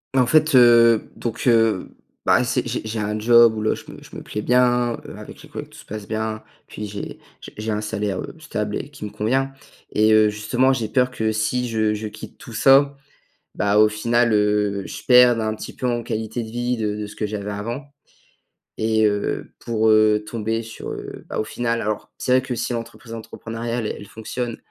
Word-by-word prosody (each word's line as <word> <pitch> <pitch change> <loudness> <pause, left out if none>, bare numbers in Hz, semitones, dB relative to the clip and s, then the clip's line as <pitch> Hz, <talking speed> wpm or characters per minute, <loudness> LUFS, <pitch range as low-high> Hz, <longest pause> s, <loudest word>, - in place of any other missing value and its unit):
Mais 125 - +5
fait, 155 +3 +3
heu, 120 -2 +6
donc, 115 -2 -4
heu, 115 -5 +3 0.3
bah, 125 - +4
c'est 120 0 -1
j'ai 120 - -2
j'ai 110 0 -4
un 105 0 -2
job 115 0 +6
où 110 - -3
là 110 - +1
je - - -11
me - - -12
je - - -14
me - - -7
plais 105 - -4
bien, 125 0 +3
heu, - - -9
avec - - -11
les - - -14
collègues - - -7
tout - - -16
se - - -13
passe 105 -1 -7
bien, 110 0 -3 0.2
puis 105 0 -7
j'ai 100 0 -7 0.2
j - - -10
j'ai 110 +1 -3
un 105 - -1
salaire, 105 -3 -2
heu, - - -6
stable 105 -9 -3
et 135 - -6
qui 140 -7 -8
me 105 - -6
convient. 130 +6 0 0.4
Et 110 +1 +3
heu, 110 -1 +6
justement 120 +5 +1
j'ai 115 -4 -2
peur 125 +1 +2
que 110 -2 -1
si 120 +3 0
je 110 -1 +1
je 105 +1 -4
quitte 105 - -11
tout 115 - -11
ça, 140 +4 +5 0.6
bah, 100 0 +2
au 110 0 +7
final, 115 +2 +1
heu, 105 -1 +1
je - - -7
perde 125 -2 +7
un 110 0 -1
petit - - -9
peu 125 - -2
en 120 -1 -1
qualité 110 +1 -3
de 110 - -8
vie 120 +1 -1
de 105 -2 -2
de 105 -1 -4
ce 105 - -11
que 105 - -2
j'avais 105 0 -4
avant 115 +7 -5 0.9
et 110 0 +2
heu, 105 -1 -1
pour 110 -1 +1
heu, 110 -1 +4
tomber 115 0 -2
sur 115 0 -8
heu, - - -8
bah, - - -5
au - - +1
final 115 +1 -2
alors 105 0 -4
c'est 125 - -2
vrai 130 - +5
que 130 -1 -4
si 120 +1 -2
l'entreprise 115 0 -6
entrepreneuriale 115 0 -5
elle 100 - -6
fonctionne, 115 +2 -5
110 Hz, 215 wpm, -22 LUFS, 105-120 Hz, 0.9 s, au